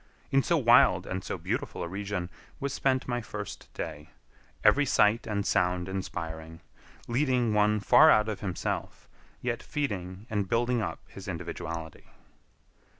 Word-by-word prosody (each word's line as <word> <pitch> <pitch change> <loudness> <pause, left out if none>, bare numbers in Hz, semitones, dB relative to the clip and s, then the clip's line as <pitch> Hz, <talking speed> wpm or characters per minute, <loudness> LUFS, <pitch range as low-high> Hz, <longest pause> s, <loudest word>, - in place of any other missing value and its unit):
In 135 - +4
so 170 +4 +2
wild 115 - +5
and 95 0 -4
so - - -4
beautiful - - -3
a - - -3
region 95 -1 -4 0.3
was 140 -1 -2
spent 130 -2 0
my 120 -1 -1
first 110 - -7
day, 75 +1 -6 0.5
every 145 - +5
sight 115 -4 +3
and 105 -2 -1
sound 90 -2 +1
inspiring, 80 -4 -5 0.5
leading 125 -2 +1
one 105 0 +3
far 125 +9 +7
out 105 -6 +5
of 110 -2 -3
himself, 95 -4 -4 0.3
yet 120 -1 -2
feeding 100 - -4
and 105 -5 -2
building 120 0 +1
up 110 - -4
his 100 +1 -11
individuality. 85 -2 -6
105 Hz, 145 wpm, -29 LUFS, 90-120 Hz, 0.5 s, far